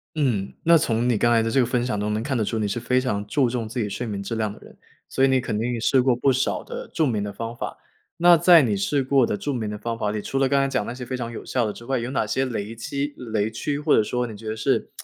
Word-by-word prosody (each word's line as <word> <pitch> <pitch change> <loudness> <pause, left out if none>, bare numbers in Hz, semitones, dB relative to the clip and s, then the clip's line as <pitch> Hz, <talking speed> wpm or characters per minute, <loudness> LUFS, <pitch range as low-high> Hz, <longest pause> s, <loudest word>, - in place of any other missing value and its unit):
嗯， 120 -10 0
那 170 0 +6
从 120 -6 0
你 120 -3 +2
刚 120 +3 +3
才 115 -1 +4
的 115 - -1
这 135 - +2
个 125 - +4
分 120 0 0
享 105 -5 -2
中 105 +1 -1
能 110 +2 -2
看 135 -2 -2
得 110 - +1
出 110 +2 -2
你 105 -1 0
是 100 +4 -2
非 125 +2 +1
常 105 -6 -2
注 130 +2 +2
重 115 -2 -3
自 120 +3 -4
己 105 - 0
睡 110 +5 -4
眠 100 -2 -4
质 115 +4 -4
量 110 -2 -1
的 105 - -12
人， - - -16 0.3
所 135 - 0
以 - - +6
你 130 -1 +3
肯 120 -4 -3
定 120 +1 -1
试 130 +3 +3
过 125 -1 +3
不 125 +3 +2
少 130 +1 0
的 - - -7
著 160 - 0
名 110 -7 0
的 105 - -4
方 115 +3 -6
法。 - - -5 0.4
那 175 0 +7
在 170 -1 +7
你 110 -5 +1
试 135 +8 0
过 130 -2 +3
的 105 - -1
著 145 - -3
名 110 -4 -3
的 105 - -5
方 115 +2 -4
法 105 - -1
里， 105 0 -2
除 135 - -2
了 135 -1 +2
刚 140 - +3
才 - - +1
讲 135 - -1
那 - - -4
些 125 0 -7
非 130 +2 -4
常 120 -2 -4
有 115 - -8
效 125 -3 0
的 105 - -3
之 120 - -12
外， 135 -1 0
有 120 - -4
哪 130 - 0
些 130 +5 0
雷 115 -3 -4
期 140 +5 -3
雷 110 -3 -2
区， 140 +6 -3
或 150 - +3
者 - - +5
说 125 +3 -1
你 110 -3 -7
觉 110 +2 -10
得 110 - -2
是 110 - 0
120 Hz, 340 characters per minute, -24 LUFS, 110-135 Hz, 0.4 s, 那